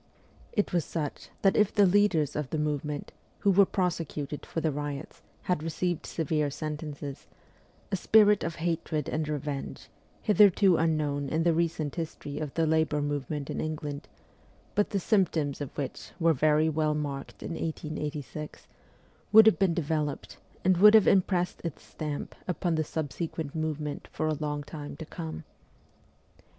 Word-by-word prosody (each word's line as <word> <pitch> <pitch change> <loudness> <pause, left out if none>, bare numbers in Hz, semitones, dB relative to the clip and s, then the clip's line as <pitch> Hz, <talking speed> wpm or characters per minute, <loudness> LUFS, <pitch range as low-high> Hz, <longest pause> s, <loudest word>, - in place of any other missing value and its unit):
It 205 -3 0
was 175 -2 +2
such 150 -4 -4
that 195 - +4
if 210 -2 +4
the 205 -2 +5
leaders 180 -7 +3
of 150 -3 -2
the 160 - -2
movement, 150 -1 -2 0.3
who 200 - +4
were 195 0 +6
prosecuted 165 -5 -2
for - - -3
the 160 -1 0
riots, 145 +1 -5 0.2
had 180 -4 0
received 165 +1 -2
severe 155 -2 0
sentences, 150 -1 -6 0.6
a - - +2
spirit 210 +2 +5
of 165 0 -3
hatred 165 -3 -2
and 155 0 -2
revenge, 145 -2 -4 0.3
hitherto 205 -3 +5
unknown 150 -3 0
in 160 +3 +1
the 170 -1 +3
recent 160 -3 -1
history 150 -3 -5
of 150 -3 -3
the 165 - +2
labour 160 -1 +2
movement 145 0 -3
in - - -2
England, 150 -2 -4 0.7
but 205 - +2
the 200 - 0
symptoms 170 -8 +1
of 140 - -3
which 140 -4 -5
were 165 -1 +4
very 155 +2 +3
well 155 -1 +1
marked 140 -2 -5
in - - -5
1886, 150 -3 -5 0.6
would 220 0 +9
have 220 - +5
been 185 -4 +3
developed, 150 -3 -2 0.3
and 185 -1 +4
would 210 +4 +8
have 215 - +7
impressed 180 -2 +2
its 165 -4 -5
stamp 150 -2 -5
upon 175 -1 0
the 160 -1 +1
subsequent 155 0 -4
movement 155 -2 -3
for 155 - -1
a 155 - +1
long 150 -1 -3
time 145 -1 -8
to 160 - -7
come. 80 - -6
155 Hz, 155 wpm, -29 LUFS, 145-170 Hz, 0.7 s, would